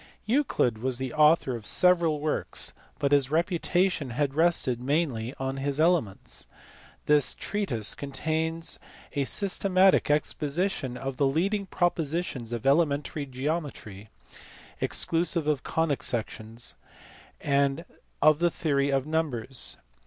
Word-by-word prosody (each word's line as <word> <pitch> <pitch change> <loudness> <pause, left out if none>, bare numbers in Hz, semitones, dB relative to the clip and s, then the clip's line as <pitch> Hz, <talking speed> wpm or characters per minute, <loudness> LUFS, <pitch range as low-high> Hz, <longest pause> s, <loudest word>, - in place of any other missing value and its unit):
Euclid 215 - +1
was 130 +1 0
the 130 +2 -4
author 150 -4 +4
of 110 -3 -7
several 170 -4 +4
works, 150 +1 -2 0.2
but 140 - 0
his 140 -2 +4
reputation 175 -1 +1
has 135 +3 -1
rested 155 -5 +2
mainly 130 -4 -1
on 135 0 -3
his 140 +1 -2
Elements. 160 - 0 0.6
This 150 -2 +3
treatise 130 - -1
contains 160 +4 -2 0.3
a 140 -2 0
systematic 190 0 +3
exposition 150 -2 -1
of 135 0 -5
the 140 - +3
leading 195 +8 0
propositions 165 -8 -1
of 120 0 -4
elementary 145 0 +1
geometry 130 - -4 0.7
(exclusive 170 -1 +1
of 150 -3 0
conic 160 -4 -1
sections) 115 0 -3 0.7
and 140 +3 +1 0.4
of 155 -1 +6
the 175 0 +3
theory 140 -4 0
of 135 -1 +1
numbers. 140 -6 -2
145 Hz, 115 wpm, -27 LUFS, 130-165 Hz, 0.7 s, of